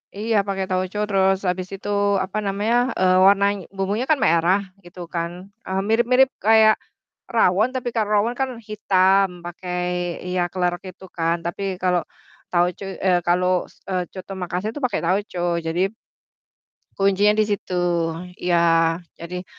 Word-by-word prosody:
Iya 220 +1 0
pakai 195 -1 -1
tauco 185 +2 -2
terus 195 -1 +3
habis 180 0 -1
itu 200 +1 -7 0.4
apa 190 +3 -6
namanya, 205 +4 0 0.2
eee, 185 0 +4
warnany 200 +1 +4 0.2
bumbunya 200 +6 -1
kan 310 - +4
merah 170 +4 +3 0.2
gitu 175 +1 -14 0.2
kan, 170 0 -1 0.4
eee, 190 +1 -1
mirip-mirip 245 +4 +4
kayak 220 +1 +5 0.6
rawon 220 0 +3
tapi 250 -1 -2
kalau 215 -2 0
rawon 230 +4 0
kan 265 - 0 0.2
hitam, 195 -2 +3 0.2
pakai 180 +1 -5 0.5
iya 180 0 -1
klerek 180 -1 -1
itu 190 - -16
kan. 165 0 +1
Tapi 175 +3 -4 0.2
kalau 180 -1 +2 0.5
tauco 175 +2 +1 0.2
eh, 180 -1 +4
kalau 180 +1 +3 0.2
s - - -24
eee, 180 -1 0
coto 185 0 -8
Makasar 180 +4 -3
itu 290 - -7
pakai 245 - -2
tauco. 185 +1 -1 0.3
Jadi 165 +2 -1 1.2
kuncinya 200 +2 +3
di 215 - +3
situ. 205 -3 -3 0.6
Ya, 165 -2 +3 0.2
jadi 180 +2 -6
190 Hz, 145 wpm, -22 LUFS, 180-210 Hz, 1.2 s, kayak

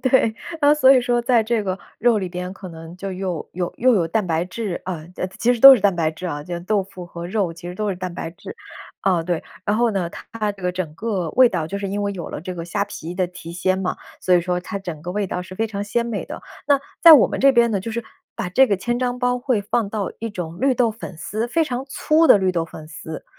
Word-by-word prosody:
对， 260 -4 +3 0.3
啊， 290 0 +6
所 270 -3 +6
以 260 - +5
说 245 0 +1
在 240 -2 +3
这 220 -1 0
个 185 -1 -2 0.2
肉 235 -1 +3
里 190 -2 -3
边 180 +1 -5
可 190 -1 -9
能 165 0 -10
就 195 +2 -6
又 185 -3 -4
有 175 0 -3
又 255 +1 +4
有 175 -6 +2
蛋 210 +5 0
白 165 0 0
质， 195 0 -4
啊 180 -4 -4
其 185 - -2
其 245 +2 +3
实 - - -5
都 270 +1 +12
是 240 - 0
蛋 200 -1 +3
白 160 -2 +1
质 160 +3 -7
啊， 145 -4 -4
就 175 0 -5
豆 200 +3 0
腐 185 -2 -10
和 170 0 -7
肉 190 -1 0
其 170 +1 -10
实 180 - -6
都 210 +2 -2
是 195 - -2
蛋 185 -1 -5
白 165 - -5
质。 170 - -10 0.5
啊， 180 -4 +2
对， 170 -1 -2 0.2
然 210 - +1
后 235 0 +3
呢， 180 -4 -1 0.2
它 215 -2 -1
这 195 -2 -15
个 180 - +1
整 180 -4 -4
个 190 -4 -2
味 255 +6 +6
道 170 -7 -2
就 200 +5 -4
是 200 -1 -3
因 205 +1 -2
为 200 0 -1
有 175 -4 -6
了 - - -6
这 180 +3 -6
个 165 -1 -5
虾 175 +4 -1
皮 175 -4 -7
的 185 0 0
提 170 -2 -10
鲜 185 +2 0
嘛， 190 -1 -2 0.2
所 185 - +3
以 175 - +5
说 180 0 -1
它 200 +3 -5
整 175 -6 -7
个 175 +3 -6
味 205 0 -1
道 180 - -3
是 185 +1 -9
非 225 +4 0
常 200 -2 -4
鲜 220 +3 -1
美 235 -3 -3
的。 - - -8 0.2
那 285 -1 +4 0.2
在 335 -2 +10
我 290 - +8
们 - - -4
这 275 - +7
边 235 -2 +4
呢， 200 -3 0
就 225 - -5
是 235 0 -3 0.3
把 230 -6 -3
这 265 +8 +5
个 200 - +1
千 240 +6 -2
张 250 0 -1
包 245 0 +1
会 245 -5 0
放 215 +1 0
到 205 -2 -3
一 230 - -4
种 175 -5 -6
绿 270 -1 +3
豆 240 -1 +2
粉 215 -5 -9
丝 215 +8 -3
非 325 +7 +2
常 260 -3 -4
粗 310 +4 +3
的 - - +8
绿 190 -2 +1
豆 170 -2 -1
粉 155 -1 -11
丝， 160 0 -8
195 Hz, 295 characters per minute, -21 LUFS, 180-235 Hz, 0.5 s, 都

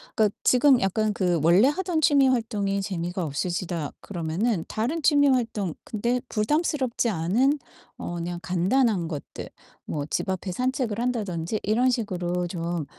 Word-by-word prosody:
그러니까 215 -3 +2
지금 255 0 +5
약간 215 +3 +1
그 180 -4 +1
'원래 175 +9 +6
하던 345 +1 0
취미 280 -3 +5
활동이 210 -5 0
재미가 180 -2 -3
없으시다.' 170 +1 -3
그러면은 175 +2 -2
다른 275 +9 -2
취미 285 -1 +5
활동 225 - 0
근데 240 +3 -1
부담스럽지 260 +1 0
않은 225 - +1 0.4
어 175 - -5
그냥 175 0 -4
간단한 185 +2 +1
것들 150 -4 -7 0.4
뭐 145 -2 -3
집 - - -1
앞에 190 0 -2
산책을 250 -2 -1
한다든지 210 -6 -2
이런 235 +5 +2
식으로 180 -6 -2
좀 170 -2 -3
205 Hz, 320 characters per minute, -25 LUFS, 175-250 Hz, 0.4 s, 원래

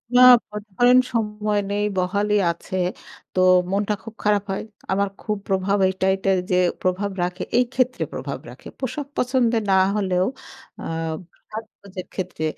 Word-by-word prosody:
না 250 - +7 0.3
মনে 210 0 -7
করেন 245 +1 +6 0.2
সময় 210 -2 0
নেই, 205 0 0
বহালি 200 +3 +1 0.2
আছে। 170 +3 -8 0.6
তো 185 - 0 0.3
মনটা 205 +1 +1
খুব 225 0 -9
খারাপ 205 -1 +2
হয়। 195 - -2 0.3
আমার 200 +1 +1
খুব 210 -1 -2
প্রভাব 195 +1 +1
এইট 190 0 -4
এইটাই 190 0 +1
যে - - +4 0.3
প্রভাব 185 +2 0
রাখে 180 +1 -3
এই 250 - +4
ক্ষেত্রে 255 -1 +1
প্রভাব - - -5
রাখে। - - -12
পোশাক 275 +2 -4
পছন্দের 245 -3 +2
না - - +5 0.2
হলেও 185 -3 +1 0.6
আ - - -7 0.7
সাজগোজের 200 -4 -8
ক্ষেত্রে 185 -4 -4
205 Hz, 150 wpm, -23 LUFS, 190-225 Hz, 0.7 s, না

